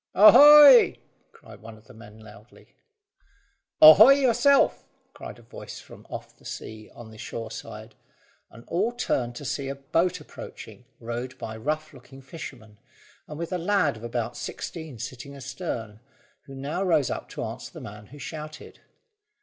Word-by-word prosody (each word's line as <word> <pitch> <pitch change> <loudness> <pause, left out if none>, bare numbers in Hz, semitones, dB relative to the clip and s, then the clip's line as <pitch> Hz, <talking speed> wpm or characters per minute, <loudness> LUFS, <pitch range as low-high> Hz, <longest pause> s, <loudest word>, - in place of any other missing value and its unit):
"Ahoy!" 280 +5 +8 0.3
cried - - -16
one 110 0 -12
of 110 - -22
the - - -16
men 110 -1 -15
loudly. 105 +1 -18 1.1
"Ahoy 205 - +10
yourself!" 275 +1 +2 0.3
cried - - -10
a - - -18
voice - - -11
from - - -16
off - - -9
the - - -26
sea 110 -1 -9
on 115 -2 -12
the 110 - -15
shore 115 0 -7
side, 110 0 -10 0.6
and 115 - -15
all 200 +7 -1
turned 120 - -3
to 145 - -9
see 135 +2 -4
a 135 - -5
boat 165 +6 -1
approaching 125 -4 -12
rowed 120 +2 -6
by 110 - -7
a 110 - -10
rough 155 +5 -4
looking 135 +1 -15
fisherman, 130 -7 -11 0.5
and 150 - -9
with 170 +3 -5
a 180 - -2
lad 175 - 0
of 110 - -13
about 120 0 -4
sixteen 160 -7 -8
sitting 130 +4 -9
astern, 130 - -7 0.5
who 135 - -12
now 140 +7 -4
rose 160 -8 +1
up - - -6
to - - -6
answer - - -8
the - - -11
man 105 0 -11
who 145 - -14
shouted. 155 +1 -9
135 Hz, 165 wpm, -25 LUFS, 115-170 Hz, 1.1 s, Ahoy